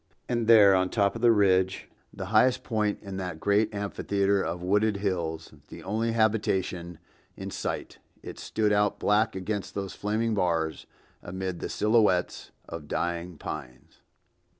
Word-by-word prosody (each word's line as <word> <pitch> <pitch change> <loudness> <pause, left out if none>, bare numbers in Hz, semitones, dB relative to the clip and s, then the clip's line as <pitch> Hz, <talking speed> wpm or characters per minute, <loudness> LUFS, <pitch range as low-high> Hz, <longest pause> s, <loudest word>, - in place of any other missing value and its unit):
And 120 -2 -1
there 105 -4 +8
on 95 0 +3
the - - -12
top 100 -1 +2
of 115 - -6
the 120 -1 +6
ridge, 95 -3 +2 0.2
the 95 - -6
highest 125 +4 +4
point 105 -3 -1
in 100 -2 -6
that 90 -4 -5
great 105 +3 +2
amphitheater 100 -1 0
of 85 +1 -4
wooded 105 +3 +2
hills, 85 -6 -3
the - - -11
only 110 +4 -1
habitation 95 -6 0 0.4
in - - -6
sight, - - -5 0.2
it - - -8
stood 105 -1 0
out 105 0 +2
black 105 +1 +2
against 100 +2 -4
those 100 -2 -4
flaming 110 +2 -1
bars, 85 -5 -1 0.3
amid 95 -1 -5
the - - -4
silhouettes 105 -4 +1 0.2
of 85 -3 -8
dying 85 +1 -3
pines. 70 -5 -8
100 Hz, 150 wpm, -27 LUFS, 90-105 Hz, 0.4 s, there